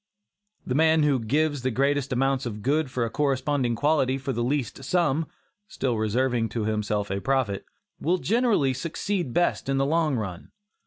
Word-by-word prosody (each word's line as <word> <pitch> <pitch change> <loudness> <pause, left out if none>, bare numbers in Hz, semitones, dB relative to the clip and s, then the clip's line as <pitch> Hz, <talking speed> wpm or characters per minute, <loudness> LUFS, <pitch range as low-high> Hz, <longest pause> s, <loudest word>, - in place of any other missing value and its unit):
The - - -2
man 160 +2 +4
who 145 -3 +3
gives 145 +5 0
the 130 - 0
greatest 140 +2 0
amount 135 0 +1
of 105 -3 -6
goods 140 -1 0
of 120 - +2
a 115 - -1
corresponding 135 -3 0
quality 135 0 +2
for 135 0 -3
the 120 - -1
least 135 0 -2
sum 160 0 +1 0.4
(still 130 - -2
reserving 115 +2 0
to 110 - 0
himself 105 -2 -1
a 100 0 -2
profit) 130 -7 0 0.3
will 175 +4 +1
generally 210 - +2
succeed 170 +2 -3
best 175 -2 0
in 135 - +1
the 135 - +2
long 155 -1 +1
run. 95 -7 -5
135 Hz, 170 wpm, -26 LUFS, 120-150 Hz, 0.4 s, man